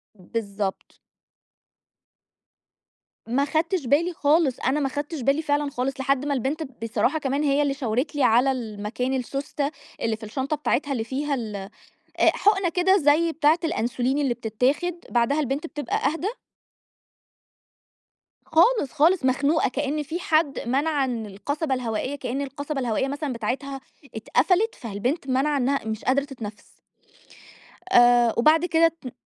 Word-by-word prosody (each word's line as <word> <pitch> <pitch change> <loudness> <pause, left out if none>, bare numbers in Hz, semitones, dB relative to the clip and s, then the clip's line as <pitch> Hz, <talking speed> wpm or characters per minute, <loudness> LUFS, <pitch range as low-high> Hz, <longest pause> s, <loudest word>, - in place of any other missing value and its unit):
بالضبط. 200 0 -5 2.3
ما 265 +5 +1
خدتش 325 +1 0
بالي 320 +8 +2
خالص، 295 -3 +2
أنا 270 +4 +1
ما 275 -2 0
خدتش 290 +2 -4
بالي 275 +5 +2
فعلًا 290 -1 0
خالص 270 +1 -3
لحد 275 0 +1
ما 290 - 0
البنت 280 +5 -1 0.2
بصراحة 250 +7 0
كمان 280 +1 -1
هي 285 0 +2
اللي 285 -1 +1
شاورت 265 +2 -2
لي 285 - +1
على 250 +3 +4
المكان 230 +1 -3
السوستة، 275 +2 -2 0.3
اللي 225 -1 0
في 220 - -14
الشنطة 265 +7 -2
بتاعتها 290 -1 -1
اللي 235 -5 -1
فيها 280 +4 -2
ال 220 -4 -5 0.6
أ - - +5
حقنة 390 -3 +3
كده 360 +3 +3
زي 325 0 +3
بتاعة 315 +1 +3
الأنسولين 255 -3 0
اللي 275 -4 +1
بتتاخد، 250 - 0 0.2
بعدها 245 +5 +2
البنت 280 +3 -2
بتبقى 295 -3 -3
أهدى 325 +7 0 2.2
خالص، 330 - +3
خالص، 320 +1 +3
مخنوقة، 280 +4 +2
كأن 290 +3 -2
في 315 +5 -4
حد 310 -5 +1
منع 280 +3 +1
إن 235 -4 -3
القصبة 275 - -3
الهوائية 250 +2 -3
كإن 270 -1 -3
القصبة 285 +1 -4
الهوائية 245 0 0
مثلًا 285 0 -3
بتاعتها 265 +4 -4 0.3
اتقفلت، 365 - +1
فالبنت 240 - -3
مانعة 270 +3 +1
إنها 275 -1 0
مش 220 0 -4
قادرة 275 +2 +2
تتنفّس. 230 -7 -9 1.2
آآ 240 -4 +6
وبعد 310 +7 +4
كده 330 -1 +4
ت 320 -7 -8
275 Hz, 140 wpm, -24 LUFS, 245-300 Hz, 2.3 s, آآ